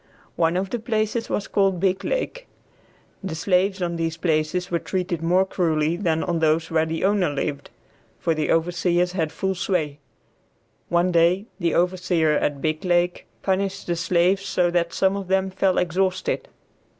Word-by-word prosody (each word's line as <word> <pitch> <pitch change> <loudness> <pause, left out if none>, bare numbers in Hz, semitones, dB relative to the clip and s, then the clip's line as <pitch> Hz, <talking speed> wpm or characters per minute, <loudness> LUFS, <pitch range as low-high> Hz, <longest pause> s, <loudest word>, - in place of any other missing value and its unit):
One 165 +1 +2
of 190 +1 -2
the 240 - -1
places 220 0 -1
was 205 - -2
called 195 -3 +1
Biglake. - - -1 0.8
The 190 -4 -4
slaves 185 +2 +1
on 170 -1 -2
these 165 0 -2
places 165 +2 0
were 170 - +1
treated 180 -3 -3
more 180 +3 +3
cruelly 160 -4 0
than 165 -3 0
on 170 -2 -1
those 160 +1 +1
where 160 0 +2
the 160 0 -3
owner 195 -3 +2
lived, 140 0 -3 0.5
for 165 - 0
the 155 -1 -1
overseers 175 +1 +1
had 165 -4 -1
full 190 +3 -1
sway. 165 -6 -1 0.9
One 175 +1 +2
day 175 +4 +3
the 170 -3 0
overseer 175 -3 +2
at 145 -1 0
Biglake 175 +3 0 0.2
punished 195 0 -1
the 175 - -1
slaves 180 +3 +2
so 175 -2 +1
that 170 -1 +1
some 190 +3 +1
of 200 -2 -5
them 190 0 +1
fell 190 0 +1
exhausted. 185 - 0
175 Hz, 160 wpm, -23 LUFS, 165-190 Hz, 0.9 s, more